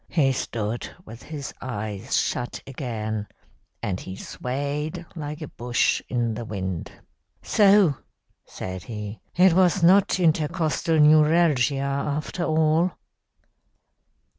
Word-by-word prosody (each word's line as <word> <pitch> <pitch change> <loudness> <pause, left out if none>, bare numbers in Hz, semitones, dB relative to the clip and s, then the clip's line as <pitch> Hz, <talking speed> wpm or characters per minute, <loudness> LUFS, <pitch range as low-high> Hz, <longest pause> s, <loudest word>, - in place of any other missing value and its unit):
He 140 -6 +3
stood 115 -3 -3
with 115 +2 -11
his 150 -3 -7
eyes 105 -5 -3
shut 120 - -1
again, 110 -6 -4 0.6
and 95 -2 -2
he 95 - -7
swayed 145 - -4
like 150 0 -5
a - - -6
bush 120 -1 0
in 120 -2 0
the 115 - -5
wind. 95 -6 -4 0.5
"'So,' 200 -8 +5 0.5
said 95 0 -6
he, 105 -1 -6 0.2
'it 180 0 +6
was 185 0 +3
not 190 +2 +5
intercostal 160 -1 +1
neuralgia 150 -2 +5
after 140 +5 -2
all.' 160 +3 +2
140 Hz, 110 wpm, -24 LUFS, 115-160 Hz, 0.6 s, it